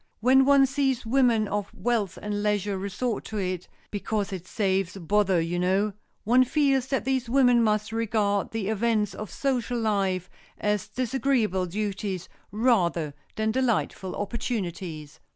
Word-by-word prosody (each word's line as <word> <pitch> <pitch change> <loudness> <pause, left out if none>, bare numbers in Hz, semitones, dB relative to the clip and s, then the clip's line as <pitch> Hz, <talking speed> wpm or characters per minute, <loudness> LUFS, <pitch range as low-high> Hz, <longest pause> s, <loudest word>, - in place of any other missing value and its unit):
When 260 +3 +5
one 280 -1 +6
sees 270 -2 0
women 235 -3 +3
of 205 0 -3
wealth 230 -6 -1
and 205 0 -3
leisure 205 -1 0
resort 200 +4 -2
to 215 - -5
it—"Because 195 +2 -3
it 185 -1 -6
saves 195 -3 0
bother, 195 +1 +2
you 170 +2 -1
know"—one 210 +6 +1
feels 270 -1 +2
that 270 -2 -1
these 260 -3 0
women 245 -2 +5
must 215 -1 +1
regard 215 -3 0
the 220 -3 -3
events 220 -1 +1
of 215 -2 -6
social 245 +1 -1
life 195 -5 0 0.3
as 210 -1 -1
disagreeable 240 -5 0
duties 195 -1 -3 0.2
rather 185 - +1 0.2
than 220 0 0
delightful 230 -6 -1
opportunities. 185 - -4
210 Hz, 135 wpm, -26 LUFS, 195-245 Hz, 0.3 s, one